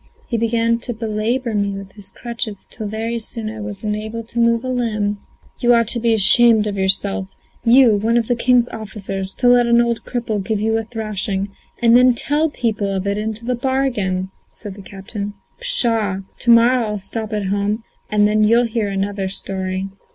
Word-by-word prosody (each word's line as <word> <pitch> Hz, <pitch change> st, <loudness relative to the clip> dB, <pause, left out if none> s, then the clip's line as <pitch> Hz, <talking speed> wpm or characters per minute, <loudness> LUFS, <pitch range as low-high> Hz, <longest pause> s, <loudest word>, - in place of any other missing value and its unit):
He 235 Hz, -, -1 dB
began 230 Hz, 0 st, +1 dB
to 240 Hz, 0 st, -5 dB
belabour 225 Hz, +2 st, -2 dB
me 200 Hz, -1 st, 0 dB
with 195 Hz, 0 st, -9 dB
his 200 Hz, -2 st, -2 dB
crutches 225 Hz, -1 st, -5 dB
till 215 Hz, -3 st, -7 dB
very 225 Hz, +2 st, -3 dB
soon 220 Hz, -1 st, -4 dB
I 220 Hz, -, -8 dB
was 205 Hz, -1 st, -7 dB
unable 215 Hz, +2 st, -3 dB
to 235 Hz, +1 st, -6 dB
move 235 Hz, 0 st, +2 dB
a -, -, -4 dB
limb." 215 Hz, -5 st, -1 dB, 0.4 s
"You 240 Hz, 0 st, +4 dB
ought 230 Hz, -2 st, +2 dB
to 235 Hz, -, -2 dB
be 230 Hz, -1 st, +2 dB
ashamed 220 Hz, +1 st, +6 dB
of 205 Hz, -1 st, -3 dB
yourself! 190 Hz, 0 st, 0 dB, 0.4 s
you, 235 Hz, -2 st, +6 dB
one 225 Hz, +3 st, +1 dB
of 230 Hz, -2 st, 0 dB
the 245 Hz, -, +1 dB
king's 245 Hz, 0 st, +3 dB
officers, 195 Hz, -3 st, -6 dB
to 250 Hz, -, +1 dB
let 245 Hz, -1 st, +5 dB
an 235 Hz, 0 st, +4 dB
old 235 Hz, -1 st, 0 dB
cripple 225 Hz, -5 st, -3 dB
give 215 Hz, +1 st, -1 dB
you 220 Hz, +1 st, 0 dB
a 225 Hz, 0 st, -1 dB
thrashing, 210 Hz, -3 st, -3 dB, 0.3 s
and 230 Hz, 0 st, +6 dB
then 250 Hz, 0 st, +6 dB
tell 300 Hz, +6 st, +2 dB
people 220 Hz, -7 st, -2 dB
of 190 Hz, 0 st, -2 dB
it 200 Hz, +1 st, -1 dB
into 220 Hz, +1 st, -4 dB
the 250 Hz, -, 0 dB
bargain!" 240 Hz, -8 st, -1 dB, 0.2 s
said 205 Hz, -, -9 dB
the 200 Hz, -, -11 dB
captain. 200 Hz, +2 st, -7 dB, 0.2 s
"Pshaw! 230 Hz, -, +3 dB, 0.2 s
to 240 Hz, -, -1 dB
morrow 235 Hz, +2 st, +5 dB
I'll 210 Hz, 0 st, -3 dB
stop 215 Hz, +3 st, -5 dB
at 210 Hz, -3 st, -2 dB
home, 205 Hz, +3 st, -1 dB, 0.3 s
and 210 Hz, -1 st, +3 dB
then 215 Hz, 0 st, +2 dB
you'll 230 Hz, +3 st, +4 dB
hear 225 Hz, -2 st, -1 dB
another 195 Hz, 0 st, -2 dB
story." 190 Hz, 0 st, -3 dB
220 Hz, 195 wpm, -19 LUFS, 205-235 Hz, 0.4 s, ashamed